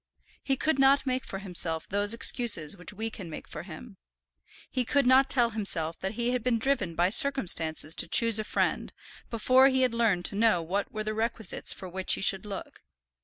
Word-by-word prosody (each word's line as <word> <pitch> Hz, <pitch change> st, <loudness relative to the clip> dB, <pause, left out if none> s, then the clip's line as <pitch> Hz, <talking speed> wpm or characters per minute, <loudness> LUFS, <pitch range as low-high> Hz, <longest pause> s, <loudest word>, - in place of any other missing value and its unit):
He 270 Hz, -, -1 dB
could 310 Hz, -1 st, -1 dB
not 270 Hz, +1 st, +3 dB
make 255 Hz, 0 st, -2 dB
for 195 Hz, -, -7 dB
himself 175 Hz, -4 st, -2 dB
those 205 Hz, +1 st, -2 dB
excuses 230 Hz, -, +3 dB
which 180 Hz, -, -8 dB
we 220 Hz, +2 st, -6 dB
can 185 Hz, -6 st, -9 dB
make 155 Hz, -, -9 dB
for -, -, -8 dB
him. 190 Hz, +5 st, -12 dB, 0.7 s
He 255 Hz, -, -1 dB
could 280 Hz, +3 st, +1 dB
not 260 Hz, +2 st, +4 dB
tell 240 Hz, -3 st, +2 dB
himself 170 Hz, -7 st, -1 dB
that 190 Hz, +2 st, -4 dB
he 235 Hz, +2 st, -2 dB
had 250 Hz, -2 st, -2 dB
been 250 Hz, -2 st, +1 dB
driven 220 Hz, -9 st, -2 dB
by 175 Hz, +3 st, +1 dB
circumstances 170 Hz, -, +2 dB
to -, -, +5 dB
choose 230 Hz, +3 st, +2 dB
a -, -, -2 dB
friend, -, -, -2 dB, 0.4 s
before 255 Hz, +3 st, +3 dB
he 260 Hz, -1 st, +1 dB
had 250 Hz, -2 st, 0 dB
learned 215 Hz, -7 st, 0 dB
to -, -, -2 dB
know 220 Hz, -3 st, +2 dB
what 195 Hz, +5 st, -3 dB
were 215 Hz, 0 st, -5 dB
the 215 Hz, 0 st, -4 dB
requisites 220 Hz, -2 st, -2 dB
for 190 Hz, -, -7 dB
which 185 Hz, +1 st, +1 dB
he -, -, -7 dB
should 195 Hz, +1 st, 0 dB
look. 200 Hz, -2 st, -9 dB
215 Hz, 205 wpm, -27 LUFS, 185-250 Hz, 0.7 s, to